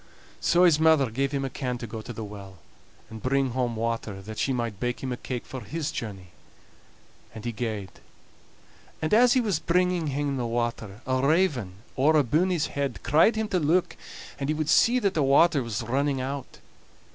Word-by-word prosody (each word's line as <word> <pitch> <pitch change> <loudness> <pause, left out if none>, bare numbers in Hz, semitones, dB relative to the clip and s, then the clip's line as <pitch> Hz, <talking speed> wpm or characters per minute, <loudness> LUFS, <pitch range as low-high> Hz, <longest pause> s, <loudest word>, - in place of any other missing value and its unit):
So 175 +1 +3
his 165 -4 +5
mother 160 -6 +4
gave 135 +4 -1
him 140 -1 -1
a - - -3
can 125 -2 -3
to 120 - -6
go 110 0 -6
to 115 - -8
the 110 -1 -6
well 100 -2 -10 0.5
and 110 -1 -8
bring 135 0 +1
home 120 -1 -1
water, 115 -3 -3
that 110 +2 -7
she 135 - +1
might 115 -5 -2
bake 125 +2 -3
him 130 - -2
a - - -1
cake 125 -1 -5
for 130 - -7
his 150 +7 -4
journey. 95 -5 -6 1.1
And 110 +1 -8
he 120 - -1
gaed, 105 -4 -4 1.1
and 155 +5 -1
as 245 +2 +6
he 255 - +3
was 205 -9 0
bringing 180 -1 +1
hame 140 0 -1
the 120 -2 -2
water, 115 -3 -3
a 130 0 0
raven 140 - +2 0.2
owre 150 +4 +4
abune 150 +7 +2
his 175 -5 +1
head 140 -3 -3
cried 160 - +4
to 220 - 0
him 220 - -2
to 185 - +1
look, 165 +4 +1 0.4
and 135 0 -2
he 155 - +1
would 155 -1 -2
see 240 +2 +5
that 200 -6 +1
the 155 - +1
water 140 +2 +4
was 115 -1 -3
running 135 +4 0
out. 135 +1 -5
135 Hz, 205 wpm, -26 LUFS, 115-155 Hz, 1.1 s, as